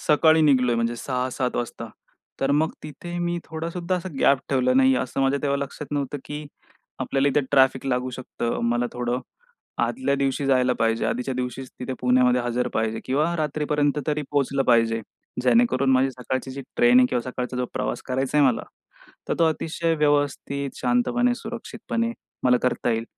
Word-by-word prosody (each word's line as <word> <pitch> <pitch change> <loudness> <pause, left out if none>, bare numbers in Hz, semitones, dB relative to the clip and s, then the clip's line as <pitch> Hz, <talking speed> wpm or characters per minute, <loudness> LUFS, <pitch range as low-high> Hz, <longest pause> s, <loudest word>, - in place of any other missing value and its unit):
सकाळी 160 +1 +4
निघालोय 125 -5 +4
म्हणजे 115 0 0
6-7 125 0 -2
वाजता. 120 - -4 0.5
तर 135 - +1
मग 155 +3 +2
तिथे 175 +4 -7
मी 175 0 -1
थोडा 160 +1 -5
सुद्धा 180 +1 -2
असा 180 +1 -5
गॅप 140 - +5
ठेवला 130 -2 +2
नाही 130 0 +5
असं 130 +2 -2
माझ्या 135 +1 +2
तेव्हा 140 -1 +1
लक्षात 140 +1 -5
नव्हतं 145 0 -2
की 150 +1 -6 0.5
आपल्याला 140 +1 +1
इथे 145 +2 +2
ट्रॅफिक 135 -1 +3
लागू 125 0 0
शकतं. 120 -2 -4
मला 120 +1 +1
थोडं 125 +1 -2 0.7
आदल्या 260 - -1
दिवशी 140 0 0
जायला 130 -2 +3
पाहिजे. 115 -1 0
आधीच्या 125 +2 -2
दिवशीच 125 +1 -4
तिथे 130 +1 -3
पुण्यामध्ये 125 0 +3
हजर 120 +1 0
पाहिजे 110 0 -1
किंवा 150 +6 +1
रात्रीपर्यंत 150 -1 0
तरी 150 0 0
पोहोचलं 140 -1 +1
पाहिजे. 115 -2 +3 0.4
जेणेकरून 140 - +3
माझी 130 +1 +3
सकाळची 130 +1 -4
जी 135 +1 -6 0.2
ट्रेन 120 +1 +6
आहे 125 - +6
किंवा 125 -1 -1
सकाळचा 125 0 -4
जो 125 - 0
प्रवास - - -3
करायचाय 135 +3 0
मला 130 -4 +3 0.7
तर - - +1
तो 170 - +5
अतिशय 165 +2 -1
व्यवस्थित, 145 -2 0
शांतपणे, 185 - +1
सुरक्षितपणे 230 0 -4 0.3
मला 125 -1 +5
करता 125 -1 0
येईल. 115 0 -1
135 Hz, 165 wpm, -24 LUFS, 125-150 Hz, 0.7 s, ट्रेन